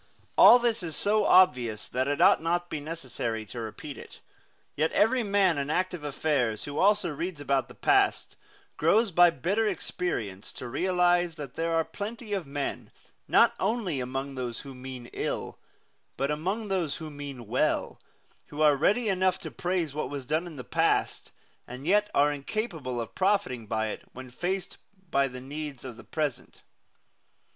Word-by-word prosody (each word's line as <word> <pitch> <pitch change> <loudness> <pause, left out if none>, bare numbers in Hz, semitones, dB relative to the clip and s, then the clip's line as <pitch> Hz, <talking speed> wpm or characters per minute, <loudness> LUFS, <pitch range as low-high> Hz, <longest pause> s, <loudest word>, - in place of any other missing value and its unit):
All - - +9
this 235 -3 0
is 165 -3 -4
so 210 0 +2
obvious 125 - +4
that 130 +1 -1
it 145 0 -1
ought - - +6
not 175 +2 0
to - - -34
be 155 - -3
necessary 130 -8 -4
to 120 +3 -8
repeat 115 +6 -7
it. - - -12 0.6
Yet 155 +2 +1
every 245 +4 +3
man 195 -7 +2
in 140 +1 -3
active 180 0 -1
affairs, 140 -6 0
who 145 +1 -4
also 205 -3 +3
reads 165 +2 -4
about 140 -2 0
the - - -14
past, - - +2 0.4
grows 205 +7 +3
by 175 +1 +7
bitter 190 - 0
experience 115 - -3
to 130 - -7
realize 175 +3 +2
that 145 -5 -8
there 165 0 -1
are 165 -1 +2
plenty 210 +5 -6
of 190 -7 -2
men, 140 0 -4 0.4
not - - +5
only 195 - -1
among 135 +2 -4
those 125 -3 -4
who 135 -1 -10
mean 125 -1 -8
ill, - - -3 0.6
but 140 +2 0
among 190 +9 -2
those 175 -7 0
who 155 -2 -7
mean 140 -4 -8
well, 130 +8 0 0.5
who 145 - -9
are 150 -2 +6
ready 210 - +2
enough 185 -2 +2
to - - -6
praise 175 -5 -2
what 150 - -3
was 140 -2 -5
done 155 +6 -1
in 165 - -9
the 125 - -7
past, - - 0 0.4
and 125 +3 -8
yet 210 +4 +3
are 145 +1 +4
incapable 145 - -4
of 115 - -5
profiting 185 - 0
by 110 0 -1
it - - -6
when 130 0 -10
faced 185 +7 -3 0.3
by 140 0 +3
the 125 -1 -8
needs 145 -1 -7
of 125 -3 -7
the - - -13
present. 150 -5 -4
155 Hz, 175 wpm, -28 LUFS, 130-185 Hz, 0.6 s, All